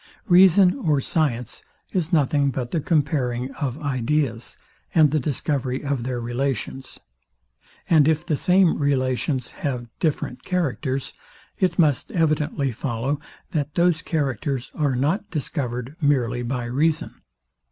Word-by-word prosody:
Reason 185 Hz, -, +6 dB
or 155 Hz, -, +2 dB
science 125 Hz, -5 st, -1 dB, 0.3 s
is 175 Hz, -2 st, -1 dB
nothing 145 Hz, -3 st, +3 dB
but 125 Hz, -2 st, -4 dB
the 165 Hz, -, 0 dB
comparing 135 Hz, -5 st, 0 dB
of 140 Hz, -3 st, -3 dB
ideas, 135 Hz, -3 st, -1 dB, 0.4 s
and 155 Hz, -4 st, +6 dB
the 155 Hz, -, +2 dB
discovery 135 Hz, -1 st, -2 dB
of 140 Hz, -3 st, -1 dB
their 125 Hz, 0 st, -3 dB
relations; 130 Hz, +2 st, -3 dB, 0.9 s
and 155 Hz, -4 st, +5 dB
if 160 Hz, +1 st, +1 dB
the 160 Hz, -4 st, 0 dB
same 180 Hz, +2 st, +3 dB
relations 130 Hz, -2 st, 0 dB
have 125 Hz, -4 st, -2 dB
different 150 Hz, -5 st, -2 dB
characters, 140 Hz, -6 st, -2 dB, 0.5 s
it 180 Hz, -3 st, +1 dB
must 150 Hz, -6 st, +2 dB
evidently 150 Hz, -4 st, +1 dB
follow, 130 Hz, +3 st, -2 dB, 0.3 s
that 145 Hz, -2 st, -2 dB
those 170 Hz, -2 st, +3 dB
characters 135 Hz, -, -2 dB
are 145 Hz, -4 st, 0 dB
not 155 Hz, -, 0 dB
discovered 130 Hz, -4 st, -4 dB
merely 125 Hz, -5 st, +1 dB
by 120 Hz, 0 st, -3 dB
reason. 150 Hz, +6 st, -1 dB
140 Hz, 125 wpm, -23 LUFS, 125-155 Hz, 0.9 s, Reason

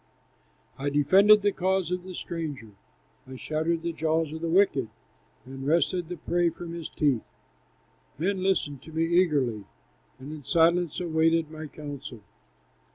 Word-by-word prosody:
I 140 Hz, +1 st, -1 dB
defended 195 Hz, +9 st, +5 dB
the 205 Hz, -, +3 dB
cause 190 Hz, -1 st, 0 dB
of 180 Hz, 0 st, -1 dB
the 185 Hz, 0 st, -9 dB
stranger, 150 Hz, -12 st, -5 dB, 0.6 s
I 130 Hz, -, -9 dB
shattered 160 Hz, +4 st, -2 dB
the 170 Hz, 0 st, -2 dB
jaws 160 Hz, -1 st, 0 dB
of 160 Hz, -, -6 dB
the 165 Hz, -, -2 dB
wicked, 165 Hz, -, +3 dB, 0.6 s
And 135 Hz, +1 st, -8 dB
wrested 170 Hz, +3 st, +1 dB
the 180 Hz, -, -5 dB
prey 175 Hz, +2 st, +1 dB
from 170 Hz, +1 st, -8 dB
his 170 Hz, -2 st, -6 dB
teeth. 140 Hz, -7 st, +1 dB, 1.0 s
"Men 185 Hz, +5 st, -1 dB
listened 170 Hz, -8 st, 0 dB
to 160 Hz, -, -13 dB
me 160 Hz, +1 st, 0 dB
eagerly, 145 Hz, -, +1 dB, 0.5 s
And 135 Hz, +3 st, -9 dB
in 155 Hz, -2 st, -8 dB
silence 170 Hz, +2 st, +2 dB
awaited 165 Hz, -2 st, +1 dB
my 155 Hz, 0 st, -7 dB
counsel. 140 Hz, -5 st, -8 dB
160 Hz, 150 wpm, -27 LUFS, 145-175 Hz, 1.0 s, defended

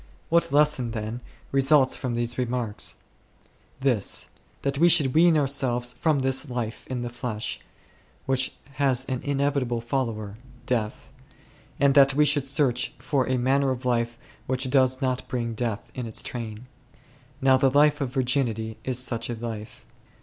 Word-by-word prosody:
What 170 Hz, -4 st, +2 dB
lesson, 145 Hz, -4 st, +3 dB
then, 110 Hz, +1 st, -5 dB, 0.3 s
results 135 Hz, 0 st, +4 dB
from 125 Hz, -3 st, -3 dB
these 120 Hz, 0 st, -1 dB
remarks? 120 Hz, -4 st, -1 dB, 0.9 s
This: 125 Hz, -7 st, +1 dB, 0.3 s
that 140 Hz, 0 st, -1 dB
we 170 Hz, +2 st, +6 dB
should 140 Hz, -6 st, +5 dB
wean 165 Hz, 0 st, +5 dB
ourselves 130 Hz, -4 st, +1 dB
from 155 Hz, +1 st, +1 dB
this 135 Hz, +1 st, +1 dB
life 120 Hz, -3 st, -4 dB
in 125 Hz, -2 st, -4 dB
the 120 Hz, -, -3 dB
flesh, 120 Hz, -2 st, -4 dB, 0.7 s
which 130 Hz, 0 st, +1 dB, 0.3 s
has 130 Hz, -2 st, +2 dB
an 130 Hz, -2 st, -3 dB
inevit 140 Hz, 0 st, 0 dB
able 120 Hz, -2 st, -2 dB
follower, 115 Hz, -4 st, -3 dB, 0.3 s
death; 110 Hz, -4 st, -3 dB, 0.7 s
and 140 Hz, -1 st, +4 dB
that 135 Hz, -1 st, +6 dB
we 150 Hz, +1 st, +4 dB
should 145 Hz, -2 st, +2 dB
search 135 Hz, -3 st, +1 dB
for 135 Hz, -3 st, -1 dB
a 130 Hz, -, +1 dB
manner 135 Hz, +2 st, +2 dB
of 130 Hz, -1 st, -3 dB
life 120 Hz, -1 st, 0 dB, 0.3 s
which 130 Hz, 0 st, -1 dB
does 130 Hz, 0 st, +3 dB
not 130 Hz, -1 st, -1 dB
bring 120 Hz, -2 st, -3 dB
death 115 Hz, -1 st, -4 dB
in 125 Hz, -3 st, -5 dB
its 110 Hz, -, -2 dB
train. 115 Hz, -1 st, -6 dB, 0.7 s
Now 130 Hz, 0 st, +4 dB
the 135 Hz, +1 st, +3 dB
life 145 Hz, +2 st, +3 dB
of 135 Hz, -, -1 dB
Virginity 125 Hz, -4 st, -1 dB
is 130 Hz, -2 st, -1 dB
such 125 Hz, -2 st, -2 dB
a 120 Hz, -, -2 dB
life. 110 Hz, -1 st, -7 dB
130 Hz, 155 wpm, -25 LUFS, 120-140 Hz, 0.9 s, we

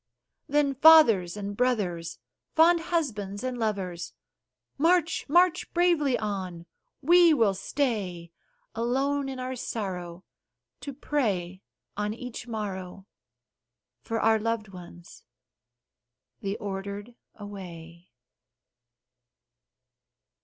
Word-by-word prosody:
Then, 290 Hz, -1 st, +2 dB
fathers 250 Hz, -, +6 dB
and 205 Hz, 0 st, -5 dB
brothers, 200 Hz, -9 st, -1 dB, 0.4 s
fond 335 Hz, +2 st, +6 dB
husbands 235 Hz, -, -2 dB
and 255 Hz, -1 st, -2 dB
lovers, 190 Hz, -6 st, -3 dB, 0.7 s
March! 335 Hz, 0 st, +2 dB
march 355 Hz, +2 st, +3 dB
bravely 335 Hz, -7 st, +3 dB
on! 185 Hz, -5 st, -4 dB, 0.4 s
We 340 Hz, +1 st, +6 dB
will 225 Hz, -7 st, +3 dB
stay, 195 Hz, -, -3 dB, 0.4 s
Alone 270 Hz, +4 st, 0 dB
in 265 Hz, -1 st, -6 dB
our 255 Hz, +1 st, -4 dB
sorrow, 185 Hz, -7 st, -5 dB, 0.6 s
to 285 Hz, -, -6 dB
pray 200 Hz, -11 st, -2 dB, 0.3 s
on 210 Hz, +1 st, -2 dB
each 250 Hz, 0 st, -8 dB
morrow 195 Hz, -4 st, -5 dB, 1.0 s
For 225 Hz, 0 st, -3 dB
our 220 Hz, 0 st, +3 dB
loved 225 Hz, -1 st, -2 dB
ones 175 Hz, -2 st, -13 dB, 1.2 s
the 200 Hz, +1 st, -3 dB
Ordered 200 Hz, +3 st, -6 dB, 0.2 s
away. 175 Hz, -4 st, -10 dB
215 Hz, 90 wpm, -27 LUFS, 190-275 Hz, 1.2 s, fathers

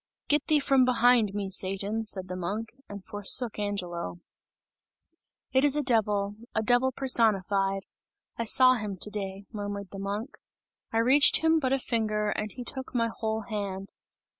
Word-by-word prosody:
"Get 295 Hz, 0 st, +2 dB
thee 305 Hz, -1 st, +4 dB
from 275 Hz, -2 st, +3 dB
behind 245 Hz, -4 st, +3 dB
me, 200 Hz, -2 st, -3 dB
Satan!" 200 Hz, +4 st, -1 dB
said 190 Hz, -3 st, -2 dB
the 180 Hz, -, -5 dB
monk, 205 Hz, +5 st, -4 dB, 0.2 s
and 200 Hz, -2 st, -9 dB
forsook 210 Hz, +3 st, +1 dB
Angelo. 180 Hz, -4 st, -4 dB, 1.3 s
"It 265 Hz, +1 st, +3 dB
is 290 Hz, -1 st, +6 dB
a 295 Hz, -, 0 dB
devil, 210 Hz, -5 st, 0 dB, 0.2 s
a 220 Hz, -, 0 dB
devil 245 Hz, +3 st, +3 dB
personified! 200 Hz, -6 st, +1 dB, 0.5 s
I 230 Hz, -, -3 dB
saw 255 Hz, +3 st, +5 dB
him 210 Hz, -5 st, -4 dB
to 210 Hz, -, 0 dB
day," 195 Hz, -1 st, -5 dB
murmured 205 Hz, -2 st, -6 dB
the 195 Hz, -, -8 dB
monk, 205 Hz, +7 st, -5 dB, 0.5 s
"I 225 Hz, -, -1 dB
reached 265 Hz, +7 st, +5 dB
him 320 Hz, 0 st, +4 dB
but 260 Hz, -4 st, -1 dB
a 270 Hz, -, +3 dB
finger, 215 Hz, -4 st, -1 dB
and 215 Hz, 0 st, -3 dB
he 245 Hz, -, -7 dB
took 260 Hz, +1 st, -5 dB
my 230 Hz, -1 st, +1 dB
whole 220 Hz, -1 st, -3 dB
hand! 200 Hz, -2 st, -5 dB
215 Hz, 165 wpm, -27 LUFS, 200-250 Hz, 1.3 s, is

